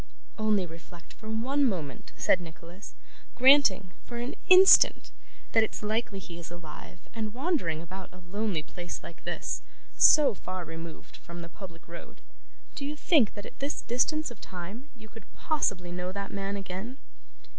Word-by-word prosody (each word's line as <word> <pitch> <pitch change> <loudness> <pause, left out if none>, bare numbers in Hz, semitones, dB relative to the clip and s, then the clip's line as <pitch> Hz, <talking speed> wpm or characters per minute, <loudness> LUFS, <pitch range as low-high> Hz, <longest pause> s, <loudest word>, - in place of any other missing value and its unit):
'Only 210 -3 +2
reflect 165 0 -13
for 220 - -11
one 255 +6 0
moment,' 165 - -2
said 185 - +3
Nicholas; 170 +3 -11 0.4
'granting, 255 -8 +6
for 240 - -8
an 240 +2 -3 0.2
instant, 375 +1 +7 0.4
that 225 - +5
it's 220 - -4
likely 215 -1 -1
he 175 -3 -9
is 170 - -8
alive 175 0 -11
and 220 -1 -4
wandering 255 - -1
about 185 +2 -9
a 185 - -14
lonely 185 -1 -3
place 175 +2 -7
like 170 - -11
this, - - -3 0.3
so 295 -5 +7
far 185 -2 -6
removed 165 0 -9
from 170 0 -9
the 170 - -9
public 170 -3 -12
road, 170 0 -11 0.5
do 295 - -6
you 290 +2 -3
think 300 - +3
that 205 - -7
at - - -12
this 280 +2 -3
distance 270 +5 0
of 235 - -12
time 195 +10 -8
you 220 -1 -13
could 225 +1 -15
possibly 200 - -1
know 180 +1 -4
that 200 +1 -5
man 195 0 -3
again? 195 +6 -6
200 Hz, 165 wpm, -28 LUFS, 175-240 Hz, 0.5 s, instant